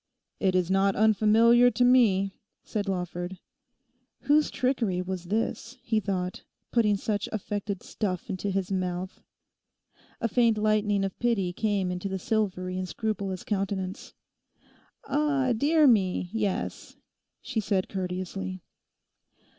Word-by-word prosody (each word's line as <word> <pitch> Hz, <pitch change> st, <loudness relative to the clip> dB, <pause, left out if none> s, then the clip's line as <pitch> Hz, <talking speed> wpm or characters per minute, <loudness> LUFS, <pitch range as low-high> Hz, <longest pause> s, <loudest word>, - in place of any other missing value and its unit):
'It 190 Hz, -2 st, +1 dB
is 180 Hz, 0 st, +1 dB
not 195 Hz, 0 st, +3 dB
unfamiliar 220 Hz, +3 st, +5 dB
to 245 Hz, 0 st, +2 dB
me,' 210 Hz, -6 st, +4 dB, 0.3 s
said 205 Hz, -2 st, -3 dB
Lawford. 180 Hz, 0 st, -3 dB, 0.8 s
Whose 295 Hz, +1 st, +3 dB
trickery 240 Hz, -8 st, 0 dB
was 180 Hz, -1 st, -4 dB
this? 225 Hz, +5 st, -2 dB
he 225 Hz, -3 st, +1 dB
thought, 185 Hz, -2 st, -3 dB, 0.3 s
putting 210 Hz, -4 st, +3 dB
such 205 Hz, 0 st, -2 dB
affected 205 Hz, -2 st, -4 dB
stuff 185 Hz, -4 st, -3 dB
into 195 Hz, -1 st, -3 dB
his 195 Hz, 0 st, -2 dB
mouth. 185 Hz, 0 st, -3 dB, 1.0 s
A 230 Hz, -, 0 dB
faint 230 Hz, 0 st, +3 dB
lightening 210 Hz, -2 st, +2 dB
of 195 Hz, -, -6 dB
pity 205 Hz, -7 st, +1 dB
came 200 Hz, -3 st, 0 dB
into 180 Hz, +2 st, -4 dB
the 190 Hz, -, -2 dB
silvery 185 Hz, -3 st, -1 dB
and 185 Hz, -1 st, -4 dB
scrupulous 200 Hz, -2 st, -3 dB
countenance. 195 Hz, -1 st, -3 dB, 0.9 s
'Ah, 280 Hz, -3 st, +1 dB
dear 305 Hz, +6 st, +4 dB
me, 190 Hz, -7 st, +3 dB
yes,' 210 Hz, -4 st, -3 dB, 0.4 s
she 240 Hz, -4 st, -3 dB
said 195 Hz, -2 st, 0 dB
courteously. 185 Hz, 0 st, -4 dB
200 Hz, 125 wpm, -27 LUFS, 185-225 Hz, 1.0 s, unfamiliar